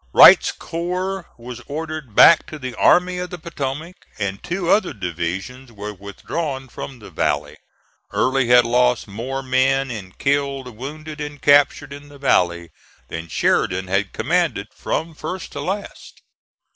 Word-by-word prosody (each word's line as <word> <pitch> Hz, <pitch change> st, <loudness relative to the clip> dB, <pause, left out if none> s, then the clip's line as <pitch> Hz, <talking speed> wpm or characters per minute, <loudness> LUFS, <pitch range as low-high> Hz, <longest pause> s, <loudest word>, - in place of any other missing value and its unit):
Wright's -, -, +8 dB
corps 180 Hz, +2 st, -4 dB
was 120 Hz, 0 st, -9 dB
ordered 155 Hz, -5 st, -6 dB
back 165 Hz, -2 st, +7 dB
to 155 Hz, -, -8 dB
the 130 Hz, -3 st, -6 dB
Army 180 Hz, +8 st, +3 dB
of 180 Hz, 0 st, -4 dB
the 180 Hz, -, -6 dB
Potomac, 155 Hz, +1 st, -5 dB, 0.2 s
and 100 Hz, -2 st, -3 dB
two 175 Hz, 0 st, -3 dB
other 190 Hz, -3 st, +3 dB
divisions 95 Hz, +7 st, -5 dB
were 105 Hz, -1 st, -7 dB
withdrawn 130 Hz, -, -5 dB
from 135 Hz, +2 st, -8 dB
the 105 Hz, -, -13 dB
valley. 75 Hz, +1 st, -1 dB, 0.6 s
Early 130 Hz, -1 st, +1 dB
had 120 Hz, 0 st, +6 dB
lost 125 Hz, 0 st, +2 dB
more 125 Hz, +7 st, -5 dB
men 135 Hz, +1 st, +1 dB
in 95 Hz, -5 st, -7 dB
killed, 140 Hz, -3 st, -1 dB
wounded 155 Hz, +5 st, -7 dB
and 150 Hz, -1 st, -6 dB
captured 145 Hz, -1 st, +3 dB
in 145 Hz, +1 st, -11 dB
the 145 Hz, -, -13 dB
valley 85 Hz, -10 st, +1 dB, 0.4 s
than 80 Hz, 0 st, -6 dB
Sheridan 90 Hz, +3 st, 0 dB
had 95 Hz, +1 st, 0 dB
commanded -, -, 0 dB
from 165 Hz, +1 st, -3 dB
first 180 Hz, +5 st, -6 dB
to -, -, -5 dB
last. 200 Hz, +2 st, -6 dB
135 Hz, 145 wpm, -21 LUFS, 105-155 Hz, 0.6 s, Wright's